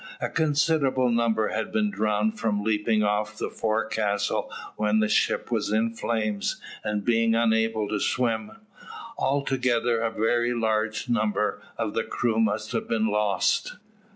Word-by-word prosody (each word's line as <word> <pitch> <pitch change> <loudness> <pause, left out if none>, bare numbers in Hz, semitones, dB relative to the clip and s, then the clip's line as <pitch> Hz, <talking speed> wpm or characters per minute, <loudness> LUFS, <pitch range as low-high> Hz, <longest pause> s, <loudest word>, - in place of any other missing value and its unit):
A - - -2
considerable 145 -4 +2
number 115 -2 +1
had 110 +1 -3
been 215 -2 +1
drowned 110 - 0
from 105 -2 0
leaping 110 0 +1
off 105 +1 -1
the - - -3
forecastle 110 -2 -1 0.2
when 105 0 +1
the 110 - +2
ship - - +1
was - - 0
in 110 +1 +1
flames, 110 -3 -2 0.2
and 105 -1 -2
being 115 -1 +3
unable 110 -2 +1
to 105 0 -2
swim. 125 - -1 0.7
Altogether 130 -4 +1
a 115 0 0
very 120 +2 +1
large 110 -1 -1
number 105 -3 0 0.2
of 110 -2 -2
the 115 - 0
crew 115 0 -1
must 110 0 0
have 115 - -2
been 110 -1 +1
lost. 105 -1 +1
110 Hz, 145 wpm, -26 LUFS, 105-120 Hz, 0.7 s, being